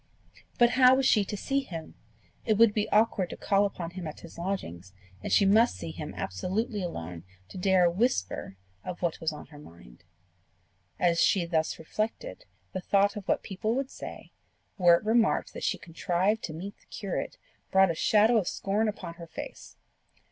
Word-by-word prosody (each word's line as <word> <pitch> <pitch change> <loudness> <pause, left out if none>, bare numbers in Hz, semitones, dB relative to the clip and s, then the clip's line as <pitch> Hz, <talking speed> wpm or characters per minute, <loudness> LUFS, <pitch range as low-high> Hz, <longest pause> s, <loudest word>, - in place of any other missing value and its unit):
But 240 0 +5
how 255 +1 +6
was 270 0 +1
she 215 -5 +4
to 210 - -5
see 275 +7 0
him? 170 -12 -7 0.5
It 220 - +2
would 225 -1 +6
be 210 -1 -1
awkward 210 -4 +2
to - - -7
call 200 0 +2
upon 175 -4 -6
him 175 -2 -6
at 155 - -8
his 170 0 -12
lodgings, 95 - -4 0.3
and - - -5
she 200 - +5
must 215 - +4
see 85 -3 -6
him 85 - -7
absolutely 205 - -2
alone 90 - -6 0.3
to - - -8
dare 185 -1 +4
a 170 - +3
whisper 170 - -1 0.3
of 180 0 -7
what 170 -1 -1
was 160 -1 0
on 150 - -9
her 145 - -11
mind. 85 - -16 1.0
As 170 -2 +3
she 185 -4 +3
thus 160 -2 0
reflected, 225 - -4 0.3
the 185 - -3
thought 200 +2 +2
of 205 -2 -7
what - - +1
people 215 +4 -2
would 270 0 -2
say, - - -9 0.4
were 175 -3 +6
it 170 - -4
remarked 225 0 +2
that - - -7
she - - 0
contrived 180 +5 -1
to 155 - -7
meet 190 +6 -8
the - - -29
curate, 195 -3 -4 0.3
brought 190 -2 +5
a - - -1
shadow 215 +7 +4
of 195 -5 0
scorn 210 +3 0
upon 200 -5 -5
her 170 - -8
face. - - -9
190 Hz, 190 wpm, -28 LUFS, 165-215 Hz, 1.0 s, how